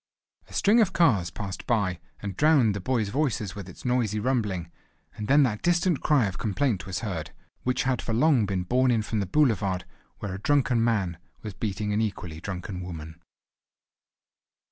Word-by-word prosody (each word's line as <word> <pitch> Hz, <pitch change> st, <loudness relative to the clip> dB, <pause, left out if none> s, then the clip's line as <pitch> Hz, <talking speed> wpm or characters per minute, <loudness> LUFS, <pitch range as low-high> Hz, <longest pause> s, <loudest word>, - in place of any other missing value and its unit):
A -, -, -15 dB
string 220 Hz, +4 st, +4 dB
of 190 Hz, -4 st, +2 dB
cars 115 Hz, -, +3 dB
passed 95 Hz, +3 st, -6 dB
by, 100 Hz, -7 st, +1 dB, 0.2 s
and 100 Hz, -3 st, -4 dB
drowned 145 Hz, -7 st, +4 dB
the 100 Hz, -, -3 dB
boys' 115 Hz, -1 st, 0 dB
voices 115 Hz, -6 st, -1 dB
with 100 Hz, -3 st, -8 dB
its 90 Hz, -, -13 dB
noisy 120 Hz, -4 st, +1 dB
rumbling; 105 Hz, -8 st, -1 dB, 0.4 s
and 105 Hz, 0 st, -5 dB
then 145 Hz, +3 st, +6 dB
that 110 Hz, -5 st, 0 dB
distant 175 Hz, -2 st, +2 dB
cry 145 Hz, -7 st, +3 dB
of 95 Hz, -2 st, -4 dB
complaint 105 Hz, -3 st, 0 dB
was 95 Hz, -1 st, -3 dB
heard, 80 Hz, -8 st, -4 dB, 0.3 s
which 125 Hz, 0 st, 0 dB
had 130 Hz, -2 st, 0 dB
for -, -, -4 dB
long 125 Hz, -2 st, +3 dB
been 95 Hz, -2 st, -1 dB
borne 125 Hz, +7 st, +2 dB
in 115 Hz, -3 st, +2 dB
from 110 Hz, 0 st, -2 dB
the 100 Hz, -, -1 dB
boulevard, 100 Hz, -8 st, +1 dB, 0.3 s
where 100 Hz, -3 st, -5 dB
a 95 Hz, -, -5 dB
drunken 130 Hz, -4 st, +2 dB
man 100 Hz, -8 st, 0 dB, 0.2 s
was 105 Hz, -2 st, -5 dB
beating 105 Hz, +2 st, -2 dB
an 105 Hz, -, +1 dB
equally 90 Hz, -7 st, -4 dB
drunken 95 Hz, -1 st, -5 dB
woman. 80 Hz, -2 st, -8 dB
105 Hz, 180 wpm, -26 LUFS, 95-130 Hz, 0.4 s, then